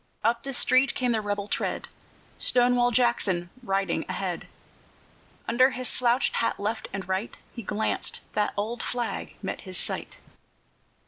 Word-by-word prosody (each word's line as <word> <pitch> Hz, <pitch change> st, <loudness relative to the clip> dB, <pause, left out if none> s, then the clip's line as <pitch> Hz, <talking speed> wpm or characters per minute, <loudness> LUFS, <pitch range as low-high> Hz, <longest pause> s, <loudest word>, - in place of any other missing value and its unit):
Up 235 Hz, +2 st, +2 dB
the 275 Hz, -, -4 dB
street 255 Hz, +2 st, +4 dB
came 250 Hz, -1 st, +1 dB
the 220 Hz, -2 st, +1 dB
rebel 205 Hz, -1 st, -2 dB
tread, -, -, -2 dB, 0.5 s
Stonewall 245 Hz, 0 st, +4 dB
Jackson 215 Hz, -8 st, +1 dB
riding 195 Hz, -4 st, 0 dB
ahead. -, -, -3 dB, 1.0 s
Under 255 Hz, +3 st, +5 dB
his 255 Hz, -2 st, -1 dB
slouched 245 Hz, +1 st, +3 dB
hat 230 Hz, -, 0 dB
left 215 Hz, +2 st, -2 dB
and 195 Hz, -1 st, -5 dB
right 190 Hz, +4 st, -2 dB, 0.2 s
He 235 Hz, -, -6 dB
glanced; 215 Hz, +1 st, 0 dB
the 210 Hz, -1 st, +1 dB
old 225 Hz, +4 st, -2 dB
flag 240 Hz, -1 st, -3 dB
met -, -, -3 dB
his -, -, -6 dB
sight. -, -, -3 dB
230 Hz, 140 wpm, -27 LUFS, 205-245 Hz, 1.0 s, Under